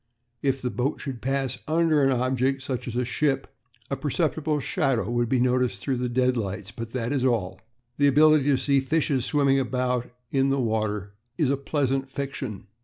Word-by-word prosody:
If 135 -1 0
the 125 - -1
boat 130 +4 -1
should 130 -5 -6
pass 135 -1 -1
under 160 -1 +3
an 135 - +4
object, 130 +1 0
such 125 -2 -4
as 120 - -4
a 125 0 0
ship, 135 +2 -1 0.4
a - - +1
perceptible 150 +2 0
shadow 135 - 0
would 120 -1 0
be 130 - +2
noticed 125 0 +1
through 135 -3 -1
the 125 0 -1
deadlights, 115 -6 -1
but 115 +3 -6
that 120 -2 -2
is 135 -3 0
all. 115 -8 0 0.4
The 145 - +4
ability 150 +1 +5
to 140 -2 +3
see 140 0 +2
fishes 135 -2 0
swimming 140 -2 +3
about 125 -1 -1 0.2
in 135 0 +2
the 135 0 +1
water 110 -4 -1 0.2
is 145 -4 +2
a - - +3
pleasant 135 -1 -1
fiction. 135 -7 -5
130 Hz, 180 wpm, -25 LUFS, 125-140 Hz, 0.4 s, ability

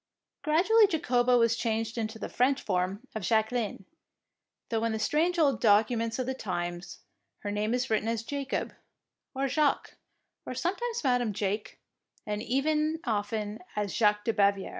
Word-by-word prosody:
Grad 310 +4 +2
ually 445 -1 +6
Jacoba 250 -6 +3
was 230 -1 +3
changed 225 0 -1
into 220 -1 -3
the - - -5
French 265 +3 +2
form 190 +5 -2
of 220 - -4
Jacqueline, 220 0 0 0.8
though 225 -1 0
in 230 -1 0
the - - -1
strange 325 +10 +1
old 280 -9 +2
documents 225 +1 +3
of 255 - -1
the 260 - -2
times 175 -6 -5 0.4
her 205 - -3
name 210 +1 -1
is 250 +1 -1
written 220 +1 +1
as 230 -1 -1
Jacob, 280 +2 -3 0.6
or 270 +1 0
Jacque, 290 +2 0 0.5
or - - -6
sometimes 460 +6 -2
Madam 245 -5 +1
Jake, 205 +2 -3 0.5
and 210 0 -3 0.6
often 210 -1 -2 0.2
as 205 -2 -2
Jaque 210 -2 +3
de 230 - +1
Baviere. 200 -2 +2
225 Hz, 155 wpm, -29 LUFS, 210-265 Hz, 0.8 s, ually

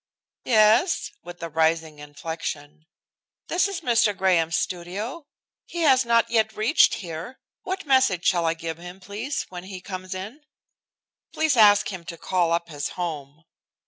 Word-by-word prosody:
"Yes?" 225 - +3
with 175 -1 -10
a 170 - -4
rising 160 -1 0
inflection, 150 0 -7 0.6
"this 360 +3 +2
is 395 -4 -5
Mr. 230 -5 +2
Graham's 170 -4 +2
studio. 205 - -4 0.4
He 345 - -5
has 265 -5 +5
not 230 -1 +2
yet 220 -2 +1
reached 225 +9 +4
here. 170 +7 -7 0.2
What 380 0 -4
message 260 - +3
shall 170 -2 +2
I 165 - +1
give 165 0 -6
him, 175 +2 -10
please, 205 +9 -4
when 180 0 -8
he 190 -1 -8
comes 185 0 -7
in?" 210 +11 -7 0.9
"Please 315 -3 +2
ask 205 -3 +6
him 180 -2 -7
to 170 - -7
call 175 -1 0
up 170 0 0
his 145 -2 -4
home." 155 -3 -5
185 Hz, 150 wpm, -24 LUFS, 165-230 Hz, 0.9 s, ask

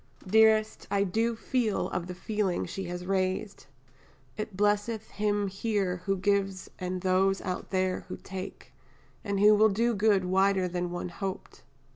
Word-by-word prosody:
Dearest, 220 +2 +3
I 200 0 +2
do 225 +5 0
feel 225 -2 0
of 180 -1 -3
the 180 - -6
feeling 205 -1 -1
she 195 - -5
has 180 0 -5
raised, 190 -1 -2 0.7
it 215 -3 -5
blesseth 210 +2 0
"him 205 -1 0
here 195 -2 -1
who 195 0 +2
gives 195 0 0
and 185 0 -3
those 190 +1 +2
out 180 -1 -4
there 185 -1 0
who - - -6
take," 190 0 -8 0.5
and 200 -2 -1
will 210 +1 +6
do 230 +4 +1
good 205 -3 +3
wider 190 0 +2
than 175 0 -2
one 175 0 -4
hoped. 190 +2 -6
195 Hz, 150 wpm, -29 LUFS, 185-210 Hz, 0.7 s, will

